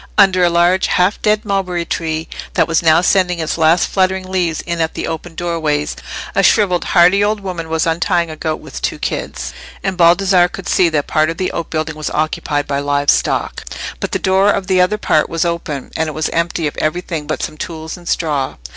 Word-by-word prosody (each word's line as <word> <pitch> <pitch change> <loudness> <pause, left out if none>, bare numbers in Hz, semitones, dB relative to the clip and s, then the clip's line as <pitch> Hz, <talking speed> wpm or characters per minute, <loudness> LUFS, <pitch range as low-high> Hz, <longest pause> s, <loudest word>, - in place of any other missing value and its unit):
Under 190 -3 +5
a 175 - +5
large 175 +2 +3
half 180 +3 +1
dead 215 0 +1
mulberry 185 -4 -1
tree 160 -1 -3 0.3
that - - +3
was 165 -1 +1
now 160 0 +5
sending 180 -1 +2
its 160 -1 -2
last 165 +2 +3
fluttering 190 0 0
leaves 175 -4 0
in 170 -1 -3
at 160 - -1
the - - -3
open 165 +1 -6
doorways, 160 -4 -1 0.4
a - - +3
shrivelled, 190 -5 +3
hardy 180 +3 +4
old 210 +1 +1
woman 175 -4 -5
was 160 0 0
untying 170 0 0
a - - -7
goat 155 0 -2
with - - -9
two - - -1
kids, - - -4 0.3
and 190 -2 -2
Baldassarre 175 +1 +4
could - - -8
see 180 -2 +3
that 150 -3 0
part 155 +1 +1
of 165 - -4
the 185 - -2
outbuilding 160 -1 -3
was 155 0 -4
occupied 150 -1 -1
by 140 0 -1
live 145 0 +2
stock; - - -1 0.4
but - - -3
the - - +1
door 190 +2 +3
of 200 -2 0
the 185 -1 +3
other 185 +4 +2
part 155 -7 +1
was 165 +1 -1
open, 170 -5 -3
and 160 -1 0
it - - -6
was 155 0 -1
empty 170 0 -1
of 150 - -2
everything 160 -1 -2
but - - -3
some - - -4
tools 160 0 -6
and 175 -2 -9
straw. 145 -5 -1
170 Hz, 210 wpm, -17 LUFS, 155-185 Hz, 0.4 s, Under